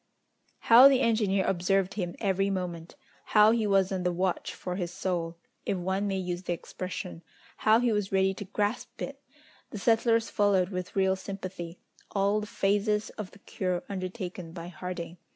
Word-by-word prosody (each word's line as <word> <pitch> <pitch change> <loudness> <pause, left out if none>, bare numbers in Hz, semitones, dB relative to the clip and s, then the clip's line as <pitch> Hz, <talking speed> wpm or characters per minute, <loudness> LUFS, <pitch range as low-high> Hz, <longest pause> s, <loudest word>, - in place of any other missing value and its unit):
How 240 +4 +9
the 270 -2 +4
engineer 210 -5 +2
observed 195 +1 +1
him 180 -4 -3
every 195 -1 +1
moment! 175 -3 -4 0.4
How 210 +1 +8
he 225 -2 +1
was 195 -1 +3
on 190 -1 -1
the 180 0 +1
watch 180 +1 -1
for 180 - -5
his 175 -2 -3
soul, 170 -2 -2 0.3
if 195 - -1
one 190 +3 -1
may 195 -1 -1
use 180 -1 -3
the 180 -1 -2
expression! 180 +1 -6 0.4
How 220 +1 +4
he 245 -1 +2
was 210 -2 -1
ready 190 0 +3
to 200 - -7
grasp 205 +3 -2
it! - - -7 0.5
The - - -7
settlers 230 +1 +2
followed 200 -3 +3
with 180 -2 -5
real 190 -1 +3
sympathy 185 -3 -7 0.3
all 200 +1 +1
the 210 - -6
phases 205 +1 0
of 210 -3 -7
the - - -17
cure 185 -3 -3
undertaken 185 -3 -5
by 170 0 -7
Harding. 180 0 -6
190 Hz, 170 wpm, -29 LUFS, 180-205 Hz, 0.5 s, How